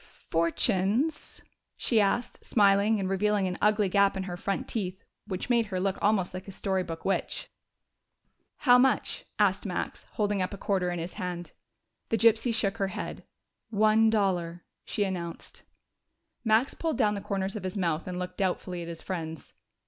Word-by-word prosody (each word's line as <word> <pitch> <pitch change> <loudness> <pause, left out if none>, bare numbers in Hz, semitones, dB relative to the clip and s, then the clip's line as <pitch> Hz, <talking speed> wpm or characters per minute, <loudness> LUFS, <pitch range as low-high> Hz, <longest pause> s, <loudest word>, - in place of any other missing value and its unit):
"Fortunes?" 195 - +1 0.3
she 225 -3 +3
asked, 215 +4 0
smiling, 205 0 +4
and 190 - -1
revealing 200 +1 +1
an 180 - -4
ugly 210 -1 +3
gap 200 +1 +3
in 190 - -2
her 180 -2 -5
front 195 +2 -2
teeth, 190 -4 -4 0.2
which 185 -3 -4
made 235 -3 +3
her 185 -2 -2
look 195 +1 -1
almost 200 -4 +2
like 185 +1 -7
a - - -6
story 190 -1 -1
book 165 -2 -6
witch. 195 - -1 1.1
"How 250 -2 +6
much?" 265 +1 +1
asked - - +3
Max, - - -4
holding 205 -3 0
up 185 +2 -2
a - - -11
quarter 190 -2 0
in 175 - -2
his 170 +2 -5
hand. 175 -1 -5 0.6
The 225 - +2
gypsy 230 +1 +4
shook 215 -2 +1
her 195 - 0
head. 190 - -6 0.5
"One 215 +1 +4
dollar," 180 -5 0 0.2
she 210 - 0
announced. 175 -4 -5 0.8
Max 225 +3 +3
pulled 325 -2 -2
down 215 -5 +3
the 200 - -4
corners 195 0 -2
of 210 - -4
his 185 +2 -3
mouth 170 -3 0
and 180 -1 -4
looked 180 0 -5
doubtfully 180 -2 -1
at 170 - -6
his 170 -1 -6
friends. 160 -4 -5
195 Hz, 170 wpm, -28 LUFS, 180-215 Hz, 1.1 s, How